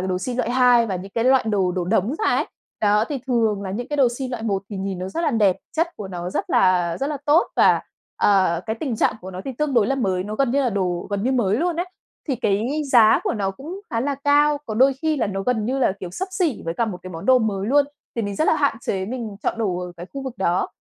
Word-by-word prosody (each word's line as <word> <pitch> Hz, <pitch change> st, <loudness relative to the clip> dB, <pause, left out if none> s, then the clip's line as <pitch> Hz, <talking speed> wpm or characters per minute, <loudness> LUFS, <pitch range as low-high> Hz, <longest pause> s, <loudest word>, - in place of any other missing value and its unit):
đồ 185 Hz, 0 st, -1 dB
si 245 Hz, +6 st, -4 dB
loại 240 Hz, -1 st, -1 dB
hai 245 Hz, -2 st, +4 dB
và 195 Hz, -4 st, -2 dB
những 190 Hz, +2 st, -8 dB
cái 230 Hz, 0 st, 0 dB
loại 260 Hz, -1 st, +4 dB
đồ 195 Hz, -4 st, +1 dB
đổ 180 Hz, -1 st, -2 dB
đống 210 Hz, +6 st, +1 dB
ra -, -, -1 dB
ấy. -, -, 0 dB, 0.3 s
Đó, 210 Hz, 0 st, +3 dB
thì 285 Hz, -3 st, -2 dB
thường 225 Hz, -5 st, +1 dB
là 190 Hz, -, -4 dB
những 240 Hz, +6 st, -4 dB
cái 295 Hz, -, -2 dB
đồ 270 Hz, -3 st, +5 dB
si 265 Hz, -, -3 dB
loại 245 Hz, -3 st, -5 dB
một 200 Hz, -3 st, -1 dB
thì 205 Hz, -, -5 dB
nhìn 190 Hz, -1 st, -3 dB
nó 185 Hz, +1 st, -4 dB
rất 260 Hz, -, -3 dB, 0.2 s
đẹp, 195 Hz, -4 st, +4 dB, 0.2 s
chất 330 Hz, +2 st, +2 dB
của 200 Hz, -, -7 dB
nó 175 Hz, -1 st, -5 dB
rất -, -, -3 dB
là 180 Hz, -2 st, +3 dB
rất 275 Hz, -, 0 dB
là 300 Hz, -, -2 dB
tốt 305 Hz, +4 st, +4 dB
và, -, -, +5 dB, 0.4 s
ờ, 185 Hz, -4 st, +3 dB
cái 220 Hz, 0 st, -2 dB
tình 260 Hz, -7 st, -2 dB
trạng -, -, +2 dB
của 185 Hz, -, -8 dB
nó 185 Hz, 0 st, -7 dB
thì 270 Hz, -, -4 dB
tương 300 Hz, -3 st, 0 dB
đối 225 Hz, -4 st, +4 dB
là 270 Hz, -, +1 dB
mới, 190 Hz, -8 st, -1 dB
nó 210 Hz, -, -5 dB
gần 270 Hz, +2 st, +1 dB
như 280 Hz, +3 st, +2 dB
là 250 Hz, -, +1 dB
đồ 180 Hz, -4 st, -1 dB
gần 200 Hz, -1 st, -1 dB
như 255 Hz, +4 st, +1 dB
mới 220 Hz, -5 st, +2 dB
luôn 340 Hz, +3 st, 0 dB
ấy. 350 Hz, +2 st, -1 dB, 0.4 s
Thì 270 Hz, -, 0 dB
cái 235 Hz, +7 st, 0 dB
giá 225 Hz, -3 st, +6 dB
của -, -, 0 dB
nó 200 Hz, -3 st, -1 dB
cũng 310 Hz, -, -8 dB
khá 230 Hz, -, -1 dB
là 280 Hz, +3 st, -1 dB
cao, 290 Hz, +1 st, +3 dB
có 215 Hz, -, -4 dB
đôi 265 Hz, +4 st, +5 dB
khi 315 Hz, -1 st, +1 dB
là 245 Hz, -, 0 dB
nó 195 Hz, -1 st, -3 dB
gần 220 Hz, 0 st, 0 dB
như 260 Hz, +4 st, -1 dB
là 245 Hz, -7 st, +2 dB
kiểu 180 Hz, -, -6 dB
xấp 380 Hz, -, -4 dB
xỉ 345 Hz, -, -1 dB
với 165 Hz, 0 st, -3 dB
cả 235 Hz, -, +1 dB
một 205 Hz, -5 st, -5 dB
cái 185 Hz, -, -8 dB
món 165 Hz, -2 st, -7 dB
đồ 260 Hz, 0 st, +6 dB
mới 205 Hz, -4 st, -1 dB
luôn, 285 Hz, +4 st, +4 dB, 0.3 s
thì 230 Hz, -, 0 dB
mình 205 Hz, -1 st, -3 dB
rất 310 Hz, -, +1 dB
là -, -, +4 dB
hạn 285 Hz, -4 st, +1 dB
chế 190 Hz, -3 st, -2 dB
mình 230 Hz, -4 st, -5 dB
chọn -, -, -1 dB
đồ 195 Hz, -6 st, -1 dB
ở 180 Hz, 0 st, -6 dB
cái 175 Hz, +1 st, -8 dB
khu 275 Hz, -, -4 dB
vực 260 Hz, -3 st, -5 dB
đó. 185 Hz, -1 st, +1 dB
220 Hz, 290 wpm, -22 LUFS, 190-265 Hz, 0.4 s, giá